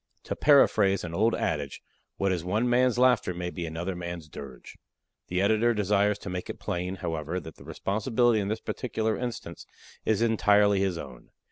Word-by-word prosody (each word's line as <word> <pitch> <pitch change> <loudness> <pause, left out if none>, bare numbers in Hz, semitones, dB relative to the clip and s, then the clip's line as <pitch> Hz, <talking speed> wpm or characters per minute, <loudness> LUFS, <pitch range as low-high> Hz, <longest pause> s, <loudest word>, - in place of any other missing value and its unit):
To - - -4
paraphrase 105 -9 +4
an 85 -2 -5
old 110 +6 +2
adage, 70 -2 -3 0.3
what 100 -1 +1
is 90 -3 -1
one 105 +7 0
man's 125 0 +3
laughter 125 -7 +3
may 90 0 -4
be 85 -2 -5
another 85 +4 -4
man's 85 -2 -6
dirge. 70 -4 -10 0.5
The 90 +2 0
Editor 110 +3 +3
desires 105 0 +2
to - - -4
make 90 0 -5
it - - -6
plain, 90 +2 -3
however, 80 +2 -2
that 80 -2 -11
the - - -14
responsibility 115 +3 +1
in 100 - -2
this 110 +2 -2
particular 110 -3 -2
instance 120 -8 -6 0.4
is 110 0 +1
entirely 105 -3 +4
his 95 -3 0
own. 65 -6 -10
100 Hz, 175 wpm, -27 LUFS, 85-110 Hz, 0.5 s, paraphrase